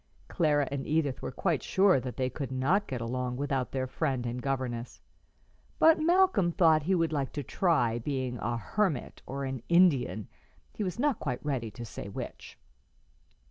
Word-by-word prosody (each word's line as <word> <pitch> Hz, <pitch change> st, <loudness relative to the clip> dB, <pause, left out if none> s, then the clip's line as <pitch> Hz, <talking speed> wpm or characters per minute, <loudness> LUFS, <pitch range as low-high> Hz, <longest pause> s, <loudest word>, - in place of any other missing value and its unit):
Clara 150 Hz, -5 st, +2 dB
and 140 Hz, -1 st, -3 dB
Edith 150 Hz, -4 st, 0 dB
were -, -, -4 dB
quite 165 Hz, +1 st, 0 dB
sure 190 Hz, -5 st, +4 dB
that 125 Hz, -1 st, -6 dB
they 130 Hz, -1 st, +1 dB
could 130 Hz, +1 st, -5 dB
not 150 Hz, +11 st, +1 dB
get 125 Hz, -3 st, -4 dB
along 125 Hz, +1 st, -2 dB
without 135 Hz, -2 st, -1 dB
their 130 Hz, -1 st, -1 dB
friend 130 Hz, -1 st, -2 dB
and 120 Hz, +1 st, -3 dB
governess, 125 Hz, -3 st, -3 dB, 0.8 s
but 320 Hz, 0 st, +6 dB
Malcolm 345 Hz, -, +4 dB
thought 160 Hz, -3 st, +4 dB
he 185 Hz, +6 st, +1 dB
would 165 Hz, -2 st, +1 dB
like 140 Hz, -3 st, -1 dB
to 145 Hz, -, -3 dB
try 120 Hz, -8 st, +1 dB
being 130 Hz, -1 st, -3 dB
a 120 Hz, +2 st, -1 dB
hermit 160 Hz, -, -1 dB
or 140 Hz, +1 st, -4 dB
an 130 Hz, -2 st, -4 dB
Indian, 170 Hz, -, +3 dB, 0.5 s
he 215 Hz, -, -3 dB
was 185 Hz, +1 st, -3 dB
not 285 Hz, +1 st, +1 dB
quite 125 Hz, -1 st, -4 dB
ready 130 Hz, -6 st, -1 dB
to 120 Hz, +3 st, -8 dB
say 100 Hz, -, -7 dB
which. -, -, -8 dB
135 Hz, 175 wpm, -29 LUFS, 125-170 Hz, 0.8 s, but